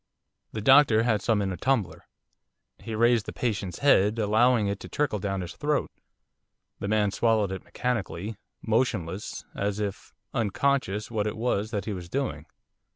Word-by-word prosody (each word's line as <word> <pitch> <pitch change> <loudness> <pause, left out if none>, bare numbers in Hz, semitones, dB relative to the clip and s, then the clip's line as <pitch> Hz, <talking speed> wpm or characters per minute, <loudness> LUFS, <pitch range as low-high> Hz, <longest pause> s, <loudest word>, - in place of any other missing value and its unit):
The 110 - -4
doctor 130 -2 +6
had 115 -3 +1
some 110 -3 +1
in 95 - -1
a 90 - -4
tumbler. 125 -9 -1 0.7
He 115 -1 -6
raised 115 -1 +3
the - - -3
patient's 100 -6 -2
head, 105 -5 +5
allowing 110 +2 +3
it 100 0 -2
to - - -9
trickle 145 -8 0
down 95 0 -2
his 90 -1 -6
throat. 150 0 -1 0.9
The - - -3
man 105 -1 +2
swallowed 110 -2 +2
it 95 - -5
mechanically, 110 -4 -3 0.3
motionless, 105 -5 -1
as 100 +1 -2
if 105 -1 -4 0.2
unconscious 115 -2 0
what 105 -2 0
it 105 - -4
was 110 -2 0
that 105 -2 -3
he 110 - -3
was 90 -2 -7
doing. 85 - -3
110 Hz, 160 wpm, -27 LUFS, 100-120 Hz, 0.9 s, doctor